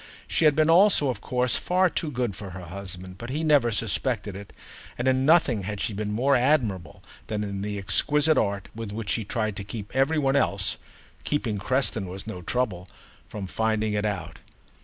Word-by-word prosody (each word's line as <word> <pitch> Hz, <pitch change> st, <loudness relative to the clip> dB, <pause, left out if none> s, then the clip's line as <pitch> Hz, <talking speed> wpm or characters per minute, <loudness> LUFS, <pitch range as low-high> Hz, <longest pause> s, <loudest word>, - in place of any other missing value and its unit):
She 160 Hz, -, +1 dB
had 150 Hz, -2 st, +5 dB
been 155 Hz, 0 st, +3 dB
also 170 Hz, -4 st, +5 dB
of 115 Hz, -5 st, -3 dB
course 125 Hz, -1 st, 0 dB
far 185 Hz, +2 st, +2 dB
too 165 Hz, -2 st, -2 dB
good 120 Hz, -7 st, -2 dB
for 100 Hz, -2 st, -7 dB
her 90 Hz, 0 st, -8 dB
husband, 95 Hz, +1 st, -8 dB
but 115 Hz, -, -7 dB
he 150 Hz, +5 st, -2 dB
never 145 Hz, -6 st, +4 dB
suspected 110 Hz, -1 st, -1 dB
it, 100 Hz, 0 st, -9 dB, 0.5 s
and 125 Hz, -, -1 dB
in 130 Hz, +1 st, +2 dB
nothing 150 Hz, -10 st, +5 dB
had 100 Hz, +1 st, -4 dB
she 105 Hz, -, -1 dB
been 105 Hz, +1 st, -3 dB
more 130 Hz, +6 st, +2 dB
admirable 120 Hz, -, 0 dB, 0.2 s
than 105 Hz, -1 st, -2 dB
in 100 Hz, -1 st, -4 dB
the 105 Hz, 0 st, -3 dB
exquisite 150 Hz, +10 st, +2 dB
art 100 Hz, -1 st, 0 dB
with 115 Hz, -2 st, -6 dB
which 105 Hz, -2 st, -4 dB
she 115 Hz, -, 0 dB
tried 110 Hz, -1 st, -2 dB
to 100 Hz, -, -4 dB
keep 105 Hz, +2 st, -8 dB
every 135 Hz, +4 st, +2 dB
one 135 Hz, -2 st, +2 dB
else 100 Hz, -8 st, +1 dB, 0.5 s
(keeping 120 Hz, -8 st, -1 dB
Creston 115 Hz, -3 st, 0 dB
was 95 Hz, +2 st, -7 dB
no 110 Hz, -5 st, -6 dB
trouble) 95 Hz, -3 st, -2 dB, 0.4 s
from 105 Hz, -2 st, -5 dB
finding 110 Hz, +2 st, 0 dB
it 105 Hz, 0 st, 0 dB
out. 90 Hz, -7 st, -3 dB
110 Hz, 195 wpm, -26 LUFS, 100-135 Hz, 0.5 s, had